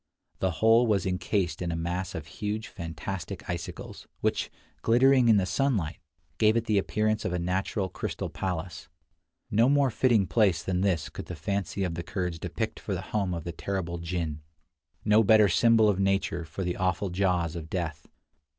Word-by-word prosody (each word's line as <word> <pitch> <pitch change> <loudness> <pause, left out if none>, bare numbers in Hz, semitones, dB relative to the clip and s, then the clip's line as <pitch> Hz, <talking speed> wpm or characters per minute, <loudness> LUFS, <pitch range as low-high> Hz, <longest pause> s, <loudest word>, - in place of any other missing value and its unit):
The 95 +3 -1
whole 115 +2 +6
was 100 -5 +2
incased 90 -2 -1
in 85 -1 -1
a - - -2
mass 85 +3 -3
of 80 - -5
huge 105 +6 -4
fantastic 85 +2 -6
icicles, 85 -1 -6
which, - - 0 0.3
glittering 125 +1 +5
in 110 - +6
the 95 - +2
sunlight, 105 - 0 0.4
gave 110 +1 +4
it 115 - 0
the 105 -2 +3
appearance 110 +2 0
of 90 - -2
a - - 0
natural 95 +3 -1
crystal - - -4
palace. 90 +1 -4 0.6
No 115 +5 +4
more 140 -2 +3
fitting 115 -4 +3
place 90 -2 +2
than 90 -1 -1
this 95 -6 +1
could - - -8
the 90 - -5
fancy 100 +3 -2
of 90 -3 -1
the 85 - -4
Kurds 90 0 -3
depict - - -3
for - - -3
the - - -4
home 100 -4 +1
of 85 - -5
the 85 - -4
terrible 85 -2 -3
jinn; 85 -3 -3 0.6
no 105 +1 +5
better 110 0 +6
symbol 115 +3 +4
of 100 -2 +2
nature 95 -4 0
for 95 +4 -5
the 90 0 -2
awful 90 +1 0
jaws 90 -3 0
of 80 -2 -6
death. 80 -4 -4
95 Hz, 180 wpm, -28 LUFS, 85-105 Hz, 0.6 s, whole